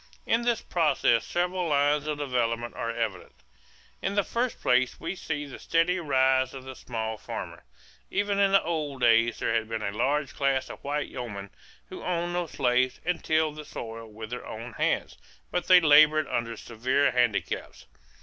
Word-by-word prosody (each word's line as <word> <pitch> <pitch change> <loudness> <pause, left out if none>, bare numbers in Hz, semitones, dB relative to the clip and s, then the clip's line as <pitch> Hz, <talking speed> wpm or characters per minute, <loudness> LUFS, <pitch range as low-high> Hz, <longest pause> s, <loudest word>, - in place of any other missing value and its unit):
In 235 - +2
this 235 -1 +1
process 145 -8 +2
several 180 0 -1
lines 145 0 +2
of 150 -1 -1
development 120 -4 -1
are 115 - -3
evident. 110 - -3 0.7
In 195 +1 -2
the 205 - +3
first 240 +4 -2
place 125 0 +2
we 165 +3 -3
see 145 -5 -4
the 140 - -10
steady 165 +3 +1
rise 130 -4 +2
of 130 - -8
the 130 0 -8
small 110 -3 -4
farmer. - - -7 0.4
Even 200 0 0
in 200 -1 +4
the 195 - +5
old 150 -5 -3
days 115 0 +4
there - - -1
had 110 -1 0
been 110 -1 -3
a 100 - -1
large 140 +7 0
class 135 -2 0
of - - -12
white 145 +1 -2
yeomen 100 -5 -6 0.4
who - - -8
owned 175 -1 -1
no 175 -1 -1
slaves 125 -2 +1
and 180 0 -1
tilled 155 -1 +1
the 155 - -6
soil 115 -5 -7
with 110 +1 -9
their 125 - -5
own 115 +2 -7
hands, - - -1 0.3
but 180 - -1
they 180 -1 +9
labored 155 -1 +6
under 115 -1 -2
severe 130 +6 +1
handicaps. 120 - -1
140 Hz, 180 wpm, -27 LUFS, 115-165 Hz, 0.7 s, they